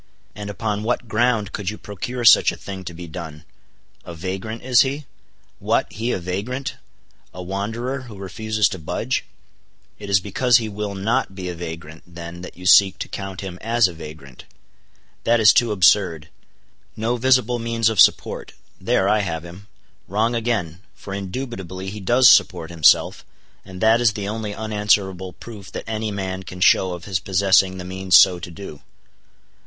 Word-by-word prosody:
And 105 0 -7
upon 105 +1 -3
what 120 +2 -2
ground 110 -2 +1
could 100 -3 -3
you 105 - -6
procure 120 +5 -5
such - - +7
a - - -9
thing 95 -1 -8
to 85 - -6
be 90 +1 -8
done?—a 80 +2 -12
vagrant, 95 +7 -5
is 125 -2 +5
he? 140 +2 -2 0.5
What! - - 0
he 115 +3 -2
a - - 0
vagrant, 100 +10 -4 0.6
a 90 - -6
wanderer, 110 +8 -4
who 105 - -10
refuses 105 +2 -1
to 95 - -6
budge? 75 - -2 0.7
It - - -8
is 100 -1 +4
because 120 +5 +2
he 115 -3 -3
will 105 -1 -5
not 110 +1 -1
be 90 -2 -5
a - - -4
vagrant, 80 -2 -8
then, 85 0 -9
that 90 - -10
you 90 - -11
seek 95 0 +6
to - - -5
count 95 -1 -6
him 90 -2 -7
as 115 -1 +3
a 90 - -7
vagrant. 75 -5 -11 0.8
That 120 0 +3
is 105 -2 +7
too 120 -2 +3
absurd. 90 -5 +3 0.7
No 115 +3 -1
visible 125 -1 +2
means 115 -1 0
of 110 -4 0
support: - - +2 0.3
there 95 - +1
I 105 - +3
have 85 -4 -3
him. 90 +4 -12 0.4
Wrong 110 +5 0
again: 110 -8 -2
for 95 - -9
indubitably 95 -3 -6
he 105 - -7
does 120 +6 +4
support 85 -9 +4
himself, 80 -3 +3 0.4
and 95 -1 -11
that 115 +2 +4
is 115 -3 +3
the 100 -1 -5
only 105 -1 -4
unanswerable 105 -4 0
proof 105 -1 -11
that - - -5
any 110 0 -3
man 95 -2 -4
can 90 0 -10
show 90 0 +4
of 90 0 -8
his 95 -3 -1
possessing 95 0 +2
the 90 - -7
means 95 0 +3
so 90 -1 +5
to 85 - -8
do. 85 -4 -10
100 Hz, 175 wpm, -21 LUFS, 90-110 Hz, 0.8 s, such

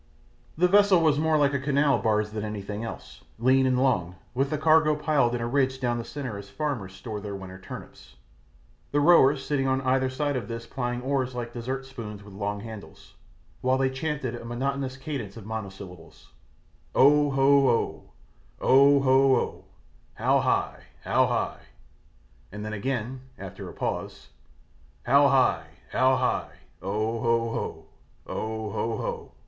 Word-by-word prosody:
The 180 +2 +4
vessel 200 -1 +5
was 155 -3 +3
more 160 0 +2
like 145 -1 +3
a 140 - 0
canal 140 +1 +2
barge 105 -2 +1
than 105 -1 -4
anything 105 0 -5
else, 115 - -8 0.2
lean 130 +3 +3
and 130 -1 +2
long, 95 -10 +1 0.2
with 135 +2 0
the 155 - -1
cargo 155 0 +4
piled 145 -5 +1
in 120 - -3
a 115 - -1
ridge 130 0 +1
down 120 -2 -1
the - - -4
centre 125 -6 -6
as 100 0 -11
farmers 115 -8 -4
store 105 +1 -6
their 100 -1 -5
winter 95 -1 -9
turnips, 65 -8 -11 0.8
the 145 - +2
rowers 145 -3 +5
sitting 135 -2 0
on 130 0 +2
either 130 0 +1
side 145 +2 -1
of 125 - -3
this 115 0 -6
plying 125 0 -3
oars 130 -2 -1
like 120 -1 -5
dessert 130 +3 -4
spoons 110 -6 -8
with 100 -1 -13
long 100 +1 -3
handles, 110 -1 -11 0.5
while 130 +1 +2
they 130 0 +1
chanted 135 -2 -3
a 120 - -7
monotonous 130 +2 -3
cadence 135 -8 -6
of 110 - -10
monosyllables: 95 -6 -8 0.7
Oh, 145 +2 +5
ho, 135 0 +4
oh, 115 - -1 0.5
Oh, 140 +1 +5
ho, 135 0 +5
oh, - - -3 0.5
How - - +2
high, - - 0 0.2
how - - +3
high. - - -2 0.9
and 105 +1 -7
then 110 - -4
again 125 +3 -3 0.2
after 95 -2 -8
a - - -10
pause 65 - -4 0.7
How - - +5
high, - - +2 0.2
how 130 0 +3
high 130 0 -1 0.3
Oh, 110 +4 -2
ho, 115 -1 +1
oh, - - -6 0.4
Oh, 110 0 -4
ho, 115 - -2
oh. - - -5
130 Hz, 165 wpm, -26 LUFS, 110-140 Hz, 0.9 s, vessel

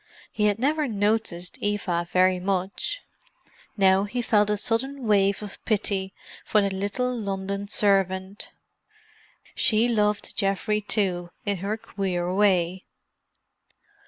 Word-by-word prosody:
He 210 - 0
had 205 -1 +1
never 295 +4 +1
noticed 205 -5 -1
Eva 185 -4 -1
very 185 0 +4
much; 195 - -2 0.8
now 195 0 +4
he 245 +4 -3
felt 210 -2 +3
a 210 - +1
sudden 260 +5 -2
wave 200 -1 +3
of 205 - -10
pity 195 -3 0 0.3
for 215 - +2
the 200 -1 +1
little 205 +6 -1
London 200 -2 -3
servant. 195 -1 +1 1.0
She 225 +1 +3
loved 210 -3 0
Geoffrey 205 +1 0
too 190 -4 0 0.2
in 200 -1 0
her 200 +4 -2
queer 185 -4 -2
way. 185 -2 +2
200 Hz, 120 wpm, -25 LUFS, 190-215 Hz, 1.0 s, very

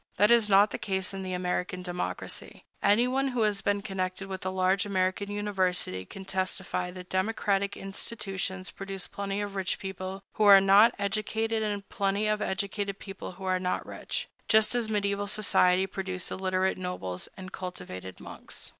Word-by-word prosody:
That 210 +3 +5
is 230 -3 +5
not 200 +1 +6
the - - -4
case 190 0 0
in 195 - -4
the 185 -1 -4
American 180 0 -2
democracy. 180 0 -5 0.2
Anyone 250 +6 +3
who 245 -4 +1
has 205 -2 +1
been 200 +1 0
connected 190 0 -3
with 190 -1 -5
a 185 - -1
large 185 +1 +2
American 190 0 0
university 185 - -1
can 190 - -10
testify 185 -1 -2
that 180 0 -9
democratic 200 0 0
institutions 195 -2 -3
produce 195 -1 -5
plenty 200 0 -3
of 205 -1 -4
rich 190 -2 0
people 190 0 -6
who 215 - +2
are 200 -1 +10
not 200 +5 +6
educated 220 +2 0
and 205 -2 -2
plenty 200 0 0
of 215 0 +1
educated 200 +1 -2
people 195 -2 -8
who 190 - -11
are 185 -1 +1
not 180 0 -1
rich, - - -4 0.2
just 220 0 +5
as 240 -2 +1
mediæval 205 -1 0
society 190 -3 +4
produced 185 -1 -4
illiterate 190 0 0
nobles 95 - -4
and 185 -1 -8
cultivated 95 - -7
monks. - - -7
195 Hz, 165 wpm, -29 LUFS, 185-205 Hz, 0.2 s, are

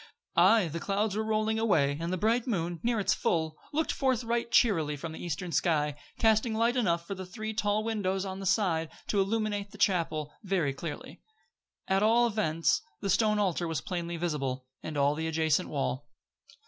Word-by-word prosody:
Aye, 190 +2 +5
the 165 +2 -4
clouds 200 +4 -1
were 220 - 0
rolling 220 0 0
away 155 -11 +2
and 170 +1 -2
the 185 - 0
bright 230 +6 +1
moon, 175 -6 -1
near 235 -1 +1
its 200 - +2
full, 160 -2 0 0.2
looked 315 +2 0
forth 260 -4 0
right 235 0 -1
cheerily 160 -12 +3
from 160 +3 -6
the 160 - -8
eastern 175 +1 -4
sky, 150 -4 +1 0.2
casting 220 0 +3
light 230 +2 +2
enough 170 -9 +1
through 195 +2 -5
the 185 - -6
three 215 +3 -5
tall 210 0 0
windows 200 -4 -1
on 190 0 -5
that 195 - -3
side 175 -5 +1 0.2
to 200 - +3
illumine 205 0 -1
the 210 - -13
chapel 160 -6 0
very 185 -9 0
clearly. 145 +1 -7 0.7
At 190 +1 +2
all 230 +3 +4
events, 200 -8 +1 0.2
the 195 - 0
stone 215 +1 +3
altar 180 -4 0
was 165 -3 -1
plainly 170 -1 -4
visible, 135 -6 -2 0.2
and 155 -2 -5
all 140 +1 +3
the 160 +2 -3
adjacent 160 +2 +1
wall. 140 -1 -2
190 Hz, 185 wpm, -29 LUFS, 160-215 Hz, 0.7 s, Aye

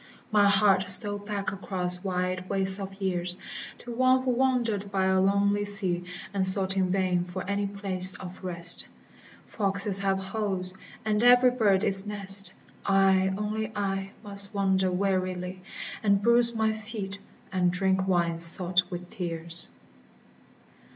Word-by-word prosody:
My 205 -1 +3
heart 195 -1 +1
stole 205 +1 +4
back 205 -1 -6
across 180 -2 0
wide 185 -1 -4
wastes 195 0 +2
of 195 0 -9
years 180 -2 0 0.4
To 240 - -10
One 255 +1 +1
who 255 - -1
wandered 240 -6 -2
by 190 -1 -1
a 190 0 +1
lonely 200 +1 0
sea, 190 -4 +1 0.3
And 190 -1 -1
sought 190 0 +1
in 190 -1 -1
vain 185 -2 -1
for 180 +1 -9
any 200 0 -3
place 190 -2 +4
of 185 +1 -11
rest: 170 -2 +5 0.3
* - - -25
'Foxes 200 -1 +1
have 195 -1 -1
holes, 190 -2 -2 0.3
and 210 0 -1
every 245 +1 +4
bird 210 -5 0
its 195 0 +9
nest, 200 -1 +1 0.3
I, 190 -1 +1
only 215 +1 -5
I, 195 -1 -4
must 200 0 -5
wander 190 -1 -1
wearily, 185 -1 -4 0.4
And 200 -2 +1
bruise 235 +2 +3
my 220 -1 -1
feet, 215 -3 -7 0.3
and 180 -2 0
drink 190 +1 -2
wine 170 -3 -1
salt 175 +1 +3
with 180 0 -9
tears." 170 -1 0
195 Hz, 145 wpm, -25 LUFS, 185-205 Hz, 0.4 s, its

